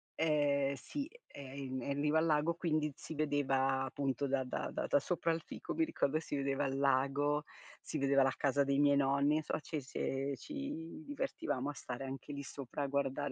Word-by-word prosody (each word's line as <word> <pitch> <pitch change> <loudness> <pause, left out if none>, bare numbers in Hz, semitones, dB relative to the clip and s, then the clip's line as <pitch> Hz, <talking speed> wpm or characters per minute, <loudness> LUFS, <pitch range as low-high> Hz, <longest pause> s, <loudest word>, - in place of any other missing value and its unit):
ehm, 145 -3 +2
sì 285 - -5 0.2
è - - -12
in 135 -1 -5
è - - -5
in 140 +1 -1
riva 150 +2 +4
al 160 - +2
lago 155 +1 +3
quindi 155 -4 0
si 160 - -8
vedeva 135 -3 +2
appunto 135 0 -1
da 135 -1 +1
da 125 - -3
da - - -2
da 145 - +4
sopra 170 +2 0
il 165 - -2
fico - - -6
mi 325 - +3
ricordo 155 - +1
si 155 - -4
vedeva 140 +1 0
il 135 0 -1
lago, 140 +2 +2 0.4
si - - -4
vedeva 140 -1 +4
la 135 - +2
casa 140 0 +3
dei 140 0 +2
miei 145 -1 +6
nonni, 140 +2 +3
insomma 155 - -1
ci 155 -2 -3
si 135 +1 -2
ci 280 - -6
divertivamo 270 - -2
a 145 - -3
stare 135 -1 -5
anche 135 +2 -6
lì 140 0 -4
sopra 140 +1 -5
a 140 - 0
guardare 140 +1 0
140 Hz, 205 wpm, -35 LUFS, 135-155 Hz, 0.4 s, miei